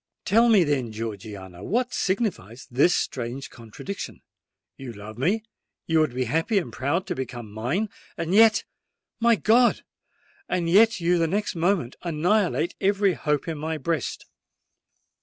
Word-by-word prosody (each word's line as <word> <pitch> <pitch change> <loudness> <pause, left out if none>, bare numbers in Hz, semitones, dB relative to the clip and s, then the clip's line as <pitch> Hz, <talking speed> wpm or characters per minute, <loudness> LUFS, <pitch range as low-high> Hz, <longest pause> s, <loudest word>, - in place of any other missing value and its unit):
Tell 230 +4 +4
me, 210 -5 +6
then, 135 -7 -1
Georgiana—what 110 - -4
signifies 185 - -2
this 145 +8 +4
strange 125 +2 -3
contradiction? 120 - -8 0.5
You 130 -3 -8
love 105 +2 -10
me—you 195 - -2
would 155 -6 +1
be 130 - 0
happy 160 - 0
and 185 - -1
proud 155 +8 -1
to 180 - -2
become 120 -6 -6
mine;—and 165 - -3
yet—my 225 +1 +2
God!—and 235 - 0
yet 220 +5 +5
you 175 0 +2
the 165 - +2
next 205 +5 -1
moment 170 -7 0
annihilate 175 +2 +1
every 195 -1 +3
hope 150 -3 -1
in 160 -2 -4
my 160 +1 -3
breast!" 160 +2 -3
165 Hz, 125 wpm, -25 LUFS, 125-200 Hz, 0.5 s, me